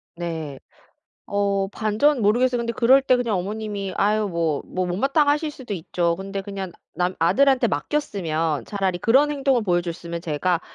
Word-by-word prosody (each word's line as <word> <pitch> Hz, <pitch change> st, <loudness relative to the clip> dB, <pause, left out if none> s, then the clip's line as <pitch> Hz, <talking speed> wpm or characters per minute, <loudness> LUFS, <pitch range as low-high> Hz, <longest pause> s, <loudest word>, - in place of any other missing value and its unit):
네. 160 Hz, -5 st, -5 dB, 0.7 s
어 200 Hz, -1 st, +1 dB
반전 220 Hz, +7 st, +1 dB
모르겠어요. 245 Hz, +4 st, +3 dB
근데 235 Hz, 0 st, -2 dB
그럴 255 Hz, +4 st, +5 dB
때 255 Hz, -, +3 dB
그냥 235 Hz, -4 st, 0 dB
어머님이 205 Hz, 0 st, -4 dB
아유 210 Hz, +1 st, +2 dB
뭐 165 Hz, -5 st, -1 dB
뭐 185 Hz, 0 st, -2 dB
못마땅하실 290 Hz, -, +1 dB
수도 245 Hz, -8 st, -6 dB
있죠. 170 Hz, 0 st, -1 dB
근데 195 Hz, +1 st, -5 dB
그냥 195 Hz, -2 st, -6 dB, 0.2 s
나 180 Hz, +1 st, 0 dB
아들한테 260 Hz, +6 st, +4 dB
맡겼으면 165 Hz, -, -1 dB
차라리 190 Hz, -3 st, -2 dB
그런 270 Hz, +9 st, +4 dB
행동을 270 Hz, -4 st, +1 dB
보여 175 Hz, -3 st, +2 dB
줬으면 170 Hz, -1 st, -5 dB
제가 170 Hz, +1 st, 0 dB
200 Hz, 340 characters per minute, -23 LUFS, 175-245 Hz, 0.7 s, 그럴